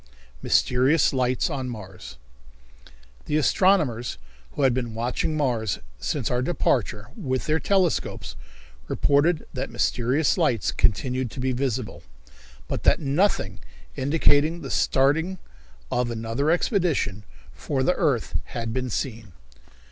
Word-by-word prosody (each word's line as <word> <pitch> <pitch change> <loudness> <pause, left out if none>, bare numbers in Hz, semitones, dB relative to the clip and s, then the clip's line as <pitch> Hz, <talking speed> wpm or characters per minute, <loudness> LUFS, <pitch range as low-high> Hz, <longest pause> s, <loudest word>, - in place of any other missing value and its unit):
Mysterious 135 +5 +3
Lights 130 -1 +1
on 135 -5 -3
Mars. 95 - -9 1.1
The 150 - 0
astronomers, 155 - +2 0.4
who 145 - -1
had 130 -2 +4
been 120 -3 -3
watching 125 +7 -1
Mars, 120 - 0 0.2
since - - -2
our 125 0 +1
departure, 120 -7 0
with 130 - -2
their 155 +1 +1
telescopes, 190 -3 0 0.5
reported 150 +4 +2
that - - -3
mysterious 130 +8 +1
lights 115 - +1
continued 125 +3 0
to 130 - -9
be 130 +1 0
visible, 125 -2 -2 0.7
but - - -3
that - - +4
nothing 140 - 0 0.4
indicating 150 +3 +2
the 135 - -6
starting 160 +8 +2 0.5
of 125 -1 0
another 115 +5 -1
expedition 170 - +1 0.3
for 135 -3 -2
the 180 - +3
earth 130 -10 0
had 115 -1 -4
been 130 0 -2
seen. 110 -6 -4
130 Hz, 120 wpm, -25 LUFS, 115-155 Hz, 1.1 s, had